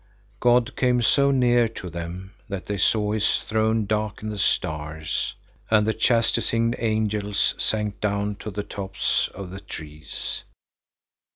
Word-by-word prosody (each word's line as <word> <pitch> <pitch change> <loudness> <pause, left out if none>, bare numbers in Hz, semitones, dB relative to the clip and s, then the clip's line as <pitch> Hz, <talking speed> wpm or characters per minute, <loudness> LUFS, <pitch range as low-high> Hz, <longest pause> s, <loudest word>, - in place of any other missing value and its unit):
God 120 -1 +3
came 125 -1 +2
so 140 +5 +4
near 120 -3 +4
to 100 -4 -8
them 85 +3 -6 0.2
that 100 -1 -4
they 100 -1 -3
saw 105 +3 +3
his 110 -1 +2
throne 110 0 +1
darken 105 0 -2
the 105 -1 -5
stars, 80 -2 -1 0.3
and 110 -1 +4
the 110 - +2
chastising 115 +1 +2
angels 110 -2 +1
sank 105 -2 -1
down 100 0 0
to 110 - -6
the 105 0 -4
tops 100 -1 -1
of 95 -2 -7
the 95 - -7
trees. 75 -2 -6
105 Hz, 135 wpm, -25 LUFS, 95-110 Hz, 0.3 s, so